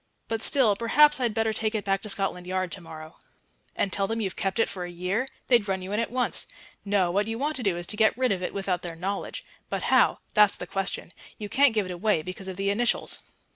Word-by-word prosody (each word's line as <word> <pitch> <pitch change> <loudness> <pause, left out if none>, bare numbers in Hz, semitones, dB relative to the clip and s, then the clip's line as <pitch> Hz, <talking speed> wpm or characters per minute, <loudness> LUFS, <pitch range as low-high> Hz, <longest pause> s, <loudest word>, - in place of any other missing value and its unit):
"But 225 -1 -2
still, 235 -7 +5
perhaps 295 +7 +4
I'd 235 -4 0
better 225 0 +1
take 215 +1 -1
it 215 - -2
back 195 0 +1
to 215 - -7
Scotland 195 -3 -1
Yard 185 -1 -1
to 190 - -4
morrow." 160 -1 -11 0.6
"And 195 - 0
tell 195 -1 +2
them 225 +2 -2
you've 195 -5 -2
kept 195 -1 -2
it 225 - +3
for 185 - -5
a 175 - -5
year? 180 +8 -2 0.2
They'd 235 -5 +3
run 190 -1 -1
you 190 - -6
in 210 - 0
at 230 - -1
once. 250 0 0 0.4
No, 195 -3 +1
what 205 +3 +1
you 225 0 -3
want 295 +4 -1
to - - -4
do 195 -6 +1
is 175 - -4
to 210 - -2
get 220 +1 +3
rid 255 -1 +2
of 190 -2 -1
it 180 - -2
without 195 -2 -2
their 170 -2 -6
knowledge. 195 +4 -4 0.2
But - - -3
how - - +5 0.2
that's 210 -1 +5
the - - -6
question. 195 -1 -3 0.3
You 210 -1 -6
can't 270 0 +4
give 210 -2 +2
it 185 - -6
away 180 -2 0
because 185 +2 -7
of 185 -1 -6
the 200 0 +1
initials." 235 +4 0
200 Hz, 250 wpm, -26 LUFS, 185-225 Hz, 0.6 s, still